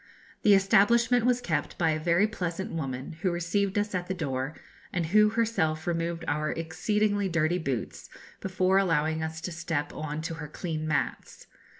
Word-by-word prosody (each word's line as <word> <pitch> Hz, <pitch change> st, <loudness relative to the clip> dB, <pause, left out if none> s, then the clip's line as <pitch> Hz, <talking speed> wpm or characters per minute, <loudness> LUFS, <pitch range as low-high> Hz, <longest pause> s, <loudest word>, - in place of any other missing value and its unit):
The 205 Hz, -1 st, +6 dB
establishment 230 Hz, +5 st, +4 dB
was 250 Hz, 0 st, +2 dB
kept 155 Hz, -10 st, -2 dB
by 160 Hz, -2 st, +2 dB
a 155 Hz, -, -1 dB
very 170 Hz, +5 st, +3 dB
pleasant 190 Hz, -4 st, -3 dB
woman, 135 Hz, -1 st, -4 dB
who 190 Hz, -, +2 dB
received 185 Hz, +3 st, 0 dB
us 205 Hz, 0 st, 0 dB
at 180 Hz, -1 st, -2 dB
the 190 Hz, -, -2 dB
door, 135 Hz, -3 st, -3 dB, 0.4 s
and 175 Hz, -2 st, -1 dB
who 210 Hz, +5 st, +5 dB
herself 210 Hz, -9 st, 0 dB
removed 170 Hz, 0 st, -2 dB
our 150 Hz, +1 st, 0 dB
exceedingly 205 Hz, +6 st, 0 dB
dirty 170 Hz, +1 st, +1 dB
boots 135 Hz, -8 st, -4 dB, 0.3 s
before 185 Hz, 0 st, +2 dB
allowing 160 Hz, -4 st, +1 dB
us 160 Hz, 0 st, -4 dB
to 180 Hz, -, -4 dB
step 165 Hz, -4 st, -3 dB
on 155 Hz, 0 st, -4 dB
to 165 Hz, -, -3 dB
her 150 Hz, -, -5 dB
clean 155 Hz, 0 st, -4 dB
mats. 155 Hz, -, -2 dB
170 Hz, 170 wpm, -28 LUFS, 155-195 Hz, 0.4 s, The